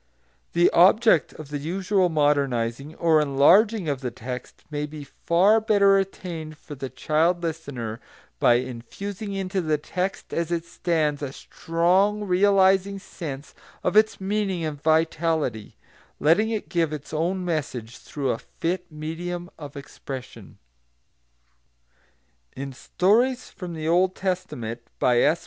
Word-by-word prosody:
The 175 Hz, +1 st, +4 dB
object 195 Hz, 0 st, +5 dB
of 155 Hz, -2 st, -10 dB
the 145 Hz, -1 st, -3 dB
usual 185 Hz, +4 st, +1 dB
modernising 140 Hz, -3 st, 0 dB
or 160 Hz, -2 st, +3 dB
enlarging 175 Hz, +8 st, +4 dB
of 140 Hz, -3 st, -1 dB
the 125 Hz, -, -2 dB
text 125 Hz, +1 st, -8 dB
may 150 Hz, 0 st, -2 dB
be 150 Hz, -1 st, -8 dB
far 185 Hz, +9 st, +3 dB
better 200 Hz, -2 st, +4 dB
attained 170 Hz, -5 st, -5 dB
for 150 Hz, -, -10 dB
the 135 Hz, -1 st, -6 dB
child 160 Hz, +7 st, +1 dB
listener 140 Hz, -9 st, -4 dB, 0.4 s
by 120 Hz, -, +5 dB
infusing 195 Hz, -, -5 dB
into 190 Hz, 0 st, -1 dB
the 155 Hz, -2 st, +1 dB
text 180 Hz, +6 st, -4 dB
as 170 Hz, 0 st, -1 dB
it 170 Hz, -1 st, -1 dB
stands 160 Hz, -4 st, -1 dB
a 140 Hz, -2 st, -3 dB
strong 185 Hz, +8 st, +1 dB
realising 195 Hz, 0 st, +3 dB
sense 150 Hz, -7 st, -8 dB, 0.3 s
of -, -, 0 dB
its 215 Hz, 0 st, +4 dB
meaning 195 Hz, -3 st, -1 dB
and 145 Hz, -2 st, -5 dB
vitality, 160 Hz, -7 st, 0 dB, 0.4 s
letting 180 Hz, +9 st, +3 dB
it 220 Hz, -2 st, -3 dB
give 165 Hz, -4 st, 0 dB
its 150 Hz, 0 st, -7 dB
own 180 Hz, +4 st, -1 dB
message 130 Hz, -9 st, -3 dB
through 140 Hz, -4 st, -3 dB
a 115 Hz, -, -3 dB
fit 180 Hz, +1 st, -4 dB
medium 175 Hz, +3 st, -5 dB
of 145 Hz, -2 st, -9 dB
expression. 135 Hz, -2 st, -9 dB, 2.0 s
[Footnote 135 Hz, -, -5 dB
1: 135 Hz, -, -7 dB
Stories 235 Hz, -, +1 dB
from 180 Hz, -4 st, -7 dB
the 155 Hz, 0 st, -4 dB
Old 180 Hz, +3 st, +3 dB
Testament, 180 Hz, -, -3 dB, 0.2 s
by 125 Hz, -1 st, +3 dB
S. 160 Hz, +3 st, +3 dB
165 Hz, 135 wpm, -25 LUFS, 145-190 Hz, 2.0 s, object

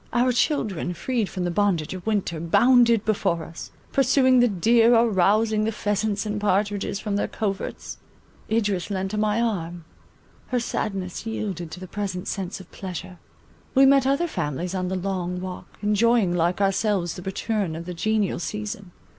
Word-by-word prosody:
Our 245 Hz, +1 st, +3 dB
children, 215 Hz, -, 0 dB
freed 230 Hz, +1 st, -1 dB
from 185 Hz, -, -4 dB
the 175 Hz, -, -1 dB
bondage 180 Hz, -5 st, +1 dB
of 185 Hz, +2 st, -8 dB
winter, 200 Hz, -7 st, 0 dB
bounded 235 Hz, +6 st, +4 dB
before 195 Hz, -6 st, 0 dB
us; 165 Hz, +2 st, -9 dB, 0.2 s
pursuing 260 Hz, -1 st, +4 dB
the 245 Hz, -, +5 dB
deer, 230 Hz, +4 st, +4 dB
or 230 Hz, +1 st, +5 dB
rousing 215 Hz, +3 st, +3 dB
the 220 Hz, -, 0 dB
pheasants 205 Hz, 0 st, -1 dB
and 210 Hz, 0 st, -3 dB
partridges 205 Hz, 0 st, 0 dB
from 210 Hz, -2 st, -2 dB
their -, -, 0 dB
coverts. 200 Hz, -3 st, -4 dB, 0.5 s
Idris 205 Hz, -5 st, 0 dB
leant 190 Hz, 0 st, -2 dB
on 210 Hz, -, -1 dB
my 215 Hz, +1 st, +1 dB
arm; 175 Hz, -7 st, -2 dB, 0.6 s
her 250 Hz, -, 0 dB
sadness 195 Hz, -3 st, -3 dB
yielded 195 Hz, -6 st, -4 dB
to 160 Hz, -, -8 dB
the 185 Hz, -, -7 dB
present 190 Hz, -1 st, -4 dB
sense 195 Hz, -1 st, -4 dB
of 185 Hz, -, -14 dB
pleasure. 185 Hz, -1 st, -7 dB, 0.6 s
We 270 Hz, +1 st, +7 dB
met 275 Hz, -1 st, +5 dB
other 280 Hz, +5 st, +2 dB
families 175 Hz, -, -3 dB
on 185 Hz, -1 st, -1 dB
the 190 Hz, -, -2 dB
Long 180 Hz, -1 st, -2 dB
Walk, 185 Hz, 0 st, -7 dB, 0.2 s
enjoying 210 Hz, -2 st, +3 dB
like 175 Hz, +2 st, +1 dB
ourselves 195 Hz, -2 st, +1 dB
the -, -, -8 dB
return 190 Hz, -1 st, -2 dB
of 165 Hz, +1 st, -6 dB
the 180 Hz, -, -5 dB
genial 210 Hz, +1 st, 0 dB
season. 210 Hz, +1 st, -5 dB
200 Hz, 170 wpm, -24 LUFS, 180-220 Hz, 0.6 s, We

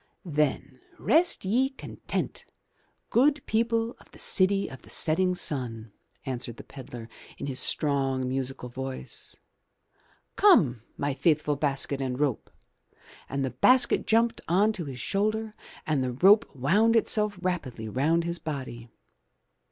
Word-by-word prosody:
"Then 145 Hz, -4 st, -1 dB, 0.2 s
rest 330 Hz, -, +2 dB
ye 250 Hz, +7 st, +2 dB
content, 270 Hz, -, -5 dB, 0.7 s
good 280 Hz, +3 st, +3 dB
people 230 Hz, +1 st, 0 dB
of -, -, -20 dB
the -, -, -17 dB
city 195 Hz, +1 st, +2 dB
of 130 Hz, -, -10 dB
the -, -, -18 dB
setting 180 Hz, +3 st, 0 dB
sun," 120 Hz, -, -4 dB, 0.3 s
answered 120 Hz, -3 st, -4 dB
the -, -, -9 dB
pedlar, 125 Hz, -4 st, -10 dB, 0.3 s
in -, -, -5 dB
his 135 Hz, -2 st, -3 dB
strong, 135 Hz, -4 st, +1 dB
musical 130 Hz, -1 st, -4 dB
voice. 130 Hz, +2 st, -7 dB, 1.0 s
"Come, 155 Hz, -, +5 dB, 0.2 s
my 145 Hz, 0 st, -1 dB
faithful 150 Hz, 0 st, +1 dB
basket 140 Hz, -1 st, -1 dB
and 130 Hz, -1 st, -3 dB
rope," 145 Hz, -5 st, -1 dB, 0.8 s
and 135 Hz, 0 st, -1 dB
the 130 Hz, -, -3 dB
basket 250 Hz, -, +3 dB
jumped 230 Hz, +1 st, +2 dB
on 200 Hz, +6 st, +3 dB
to 175 Hz, -6 st, -5 dB
his 130 Hz, -3 st, -7 dB
shoulder 215 Hz, -, -1 dB, 0.3 s
and 150 Hz, -4 st, 0 dB
the 125 Hz, -1 st, -2 dB
rope 200 Hz, -, +5 dB
wound 200 Hz, -, +3 dB
itself 210 Hz, -2 st, +2 dB
rapidly 155 Hz, -12 st, -3 dB
round 155 Hz, +9 st, +1 dB
his 170 Hz, 0 st, -2 dB
body. 130 Hz, -6 st, -6 dB
150 Hz, 135 wpm, -27 LUFS, 130-210 Hz, 1.0 s, Come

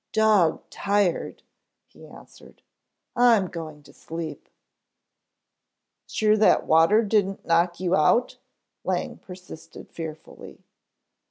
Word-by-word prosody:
"Dog 215 Hz, -7 st, +2 dB
tired," 200 Hz, -3 st, -1 dB, 0.4 s
he -, -, -17 dB
answered. -, -, -17 dB, 0.5 s
"I'm 235 Hz, -5 st, +4 dB
going 155 Hz, -4 st, -9 dB
to -, -, -18 dB
sleep." 160 Hz, -3 st, -8 dB, 1.6 s
"Sure 215 Hz, 0 st, +1 dB
that 215 Hz, -, +3 dB
water 165 Hz, +8 st, +4 dB
didn't 200 Hz, -2 st, -1 dB
knock 170 Hz, +1 st, +1 dB
you 180 Hz, 0 st, 0 dB
out?" 230 Hz, +11 st, +2 dB, 0.4 s
Lang -, -, -3 dB
persisted 180 Hz, -3 st, -13 dB
fearfully. 160 Hz, -2 st, -10 dB
180 Hz, 95 wpm, -24 LUFS, 165-210 Hz, 1.6 s, I'm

